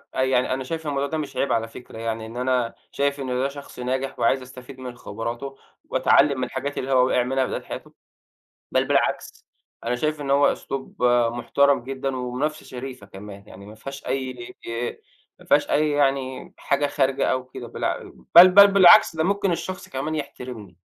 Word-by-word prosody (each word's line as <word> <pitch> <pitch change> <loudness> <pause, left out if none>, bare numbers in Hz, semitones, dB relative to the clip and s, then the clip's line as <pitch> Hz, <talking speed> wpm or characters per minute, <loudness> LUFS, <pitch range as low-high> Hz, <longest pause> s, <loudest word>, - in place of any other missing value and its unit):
أنا 130 - +2
يعني 130 -1 +1
أنا 130 +1 -3
شايف 160 +3 -5
الموضوع 140 -1 -1
ده 160 - -3
مش 150 -2 -5
عيب 140 - 0
على 115 -1 +1
فكرة، 115 0 -12
يعني 115 0 -3
إن 115 +2 -9
أنا 125 -2 0 0.2
شايف 140 0 -1
إن 135 - -4
ده 125 +2 0
شخص 140 -2 -11
ناجح، 130 +2 -3
وعايز 130 +3 +2
أستفيد 130 +1 -12
من 125 -1 -7
خبراته، 120 +6 -6 0.3
وأتعلم 140 -1 +4
من 130 - -1
الحاجات 145 0 -5
اللي 135 - -3
هو 130 -1 +4
وقع 125 -1 +2
منها 130 +1 0
في - - -5
بداية - - -3
حياته، - - -9 0.8
بل - - +3
بالعكس - - 0 0.4
أنا 120 +1 0
شايف 155 +2 -2
إن 140 -1 -4
هو 140 +1 +5
أسلوب 135 -2 -7 0.3
محترم 120 +2 +2
جدًا، 135 0 -3
ومنافسة 130 +5 -3
شريفة 125 -4 -8
كمان، 100 +1 -11
يعني 100 +1 -12
ما 105 - -11
فيهاش 135 +4 -9
أي 130 -3 -4 0.8
ما - - -17
فيهاش - - +3
أي 150 +1 +2
يعني 135 -2 0
حاجة 140 +1 0
خارجة 135 -1 0
أو 130 0 -2
كده، 130 - -9
بالع - - -3 0.2
بل 175 +2 +11
بل 200 +2 +9
بالعكس، 195 -2 +7
ده 160 - +1
ممكن 200 -1 +1
الشخص 185 +2 -5
كمان 140 +4 -3
يحترمني. 125 - -7
130 Hz, 185 wpm, -23 LUFS, 125-140 Hz, 0.8 s, بل